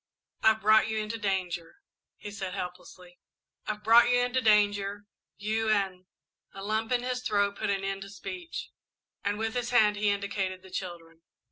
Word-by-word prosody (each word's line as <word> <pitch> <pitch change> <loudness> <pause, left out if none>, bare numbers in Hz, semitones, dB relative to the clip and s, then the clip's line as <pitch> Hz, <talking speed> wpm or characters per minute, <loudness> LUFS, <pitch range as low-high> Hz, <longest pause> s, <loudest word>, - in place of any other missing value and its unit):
"I've 220 0 +4
brought 215 +1 +5
you 220 0 -2
into 215 +1 -3
danger," 185 -5 -2 0.4
he 205 - -8
said 190 -2 -5
helplessly, 180 -1 -8 0.5
"I've 210 0 -3
brought 230 +2 +7
you 245 - +4
into 245 +1 +1
danger, 205 -2 +2 0.3
you 220 +2 -1
and 190 -3 0 0.2
" - - -45
A - - -7
lump 220 +2 -1
in 245 -1 +2
his 250 0 -2
throat 200 -4 +1
put - - -2
an 195 -1 0
end 195 0 -3
to 195 - -8
speech, 345 - -7 0.5
and 205 +1 0
with 225 0 -2
his 245 -1 -2
hand 215 -4 +4
he 210 0 +2
indicated 200 -2 -2
the 190 - -14
children. 170 -3 -7
205 Hz, 175 wpm, -29 LUFS, 195-220 Hz, 0.5 s, brought